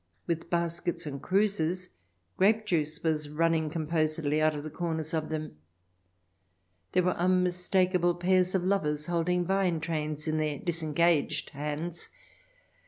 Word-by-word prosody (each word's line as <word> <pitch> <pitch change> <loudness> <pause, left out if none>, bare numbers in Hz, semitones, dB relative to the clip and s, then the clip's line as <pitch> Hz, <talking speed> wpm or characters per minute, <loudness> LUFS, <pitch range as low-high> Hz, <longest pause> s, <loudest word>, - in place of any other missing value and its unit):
— - - -43
with 170 0 -3
baskets 170 0 -1
and 140 -2 -5
cruses; 185 -3 +1 0.5
grape 215 +3 +3
juice 155 -5 -1
was 155 -2 0
running 160 0 +1
composedly 155 -1 0
out 155 0 +3
of 145 - -5
the 155 - -6
corners 160 -1 -3
of 155 -1 -1
them. 155 - -4 1.4
There 180 - +3
were 180 0 +2
unmistak 180 +1 +2
able 175 -1 +2
pairs 185 +1 +2
of 185 - +1
lovers 150 -6 0
holding 175 +1 0
vine 190 -3 +1
trails 155 -2 -3
in 155 0 0
their 155 -2 -1
disengaged 165 -1 +1
hands. 150 +4 -4
165 Hz, 140 wpm, -29 LUFS, 155-180 Hz, 1.4 s, grape